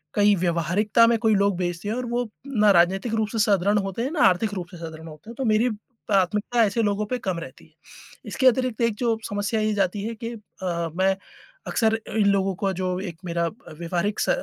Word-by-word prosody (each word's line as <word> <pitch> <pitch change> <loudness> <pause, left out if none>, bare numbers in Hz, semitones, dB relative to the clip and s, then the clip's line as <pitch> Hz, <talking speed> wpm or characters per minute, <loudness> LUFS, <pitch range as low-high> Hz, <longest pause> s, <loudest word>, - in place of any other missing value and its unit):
कई 205 0 +5
व्यवहारिकता 180 +6 +2
में 235 0 +3
कोई 220 -2 +3
लोग 200 -2 +2
बैसे 175 +2 -3
हैं 220 - -1
और 250 0 -3
वो 240 0 -2 0.2
ना 215 -6 +4
राजनीतिक 190 +5 +2
रूप 220 -1 0
से 225 - -3
सुदृढ़ 205 -1 +3
होते 195 +2 -3
हैं, 265 - -2
ना 320 - -1
आर्थिक 195 +3 +2
रूप 180 -2 -4
से 175 - -10
सुदृढ़ 160 -1 -8
होते 155 +7 -13
हैं। - - -11
तो 265 - -2
मेरी 220 +2 +3 0.4
प्राथमिकता 210 +4 +2
ऐसे 215 +3 0
लोगों 205 0 0
पे 250 - -1
कम 190 -5 -2
रहती 135 -5 -11
है 160 - -25 0.6
इसके 260 - -1
अतिरिक्त 255 -2 0
एक 230 -2 +2
जो 235 -2 +1
समस्या 205 +2 -1
ये 215 0 +1
जाती 200 0 0
है 230 +1 -3
कि 230 +1 -5
अ, 180 -6 -4
मैं 190 +1 +2 0.5
अक्सर 225 -2 +1 0.2
इन 205 - +3
लोगों 195 -1 +2
को 195 0 -1
जो 185 -1 -1
एक 180 -4 -6
मेरा 170 0 0 0.2
व्यवहारिक 175 +6 -2
स - - 0
205 Hz, 215 wpm, -24 LUFS, 180-225 Hz, 0.6 s, कई